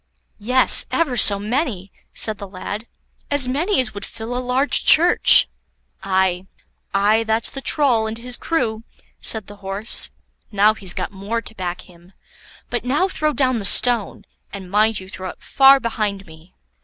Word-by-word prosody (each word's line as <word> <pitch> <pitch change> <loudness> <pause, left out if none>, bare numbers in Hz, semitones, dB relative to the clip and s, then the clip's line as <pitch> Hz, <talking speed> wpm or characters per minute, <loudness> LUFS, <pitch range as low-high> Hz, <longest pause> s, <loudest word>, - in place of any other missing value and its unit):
"Yes, 250 +5 +4
ever 305 -7 -1
so 205 -3 +6
many," 210 - -3 0.2
said 215 -2 -2
the 200 - -8
lad, 205 +4 -7 0.4
"as 285 -3 +2
many 315 +10 0
as 255 - -1
would 200 0 -8
fill 230 +2 -7
a - - -2
large 255 +3 0
church." 345 +3 +6 0.5
"Aye, 190 -1 -1 0.4
aye, 205 +3 +2
that's 225 0 0
the 270 - -7
Troll 255 -7 +1
and 220 +1 -6
his 245 +1 -4
crew," 230 -10 -2 0.4
said 220 -3 -2
the 205 +1 -13
Horse; 200 +3 -1 0.4
"now 210 +1 +3
he's 190 -4 -4
got - - -4
more 200 +4 -4
to - - -8
back 180 -4 -5
him; 175 +1 -20 0.6
but 240 -1 -3
now 285 +9 0
throw 305 -5 -1
down 255 -4 0
the - - -6
stone, 230 +1 +3 0.3
and 190 -2 -9
mind 215 +1 +2
you 185 - -12
throw 185 0 -7
it - - -13
far 270 0 +5
behind 210 -5 -3
me." 160 +2 -18
220 Hz, 165 wpm, -19 LUFS, 195-250 Hz, 0.6 s, so